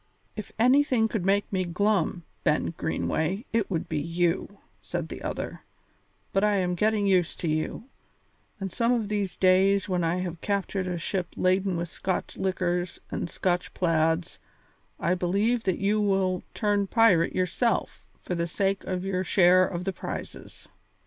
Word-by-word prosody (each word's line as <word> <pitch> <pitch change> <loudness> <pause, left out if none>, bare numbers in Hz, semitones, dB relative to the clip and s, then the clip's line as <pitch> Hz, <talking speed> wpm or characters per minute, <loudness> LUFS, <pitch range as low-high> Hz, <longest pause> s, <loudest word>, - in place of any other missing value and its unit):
"If 210 -2 -7
anything 250 -1 +4
could 215 -4 -2
make 200 +2 +2
me 185 -1 +1
glum, 180 -1 0 0.2
Ben 150 +2 +1
Greenway, 180 - -1
it 225 -3 +1
would 165 -4 -2
be 155 - -1
you," 170 +5 -1 0.2
said - - -4
the - - -7
other; - - -4 0.7
"but 195 - +2
I 210 -1 +3
am 180 -2 +1
getting 210 +3 +1
used 185 -4 +2
to 170 - -1
you, 155 +6 -1 0.8
and 195 -2 -4
some 235 -1 +2
of 230 -4 0
these 205 -3 -2
days 190 +1 +4
when 180 -3 0
I 165 +1 +1
have 180 -2 -4
captured 200 -2 -1
a 180 -1 -2
ship 180 +1 -2
laden 185 0 +1
with 170 +1 -2
Scotch 185 +2 -3
liquors 180 -2 -1
and - - -3
Scotch 180 0 -1
plaids 165 -1 +1 0.6
I 175 - +1
believe 200 +7 +1
that 185 -2 +1
you 210 +2 +1
will 190 -3 +1
turn 205 -2 +1
pirate 195 -7 +4
yourself 185 +6 0 0.2
for - - -5
the 170 -1 -1
sake 195 +3 0
of 185 0 -3
your 185 -1 -1
share 185 +1 +5
of 175 -1 -4
the 195 +1 -2
prizes." - - -8
185 Hz, 160 wpm, -27 LUFS, 175-205 Hz, 0.8 s, share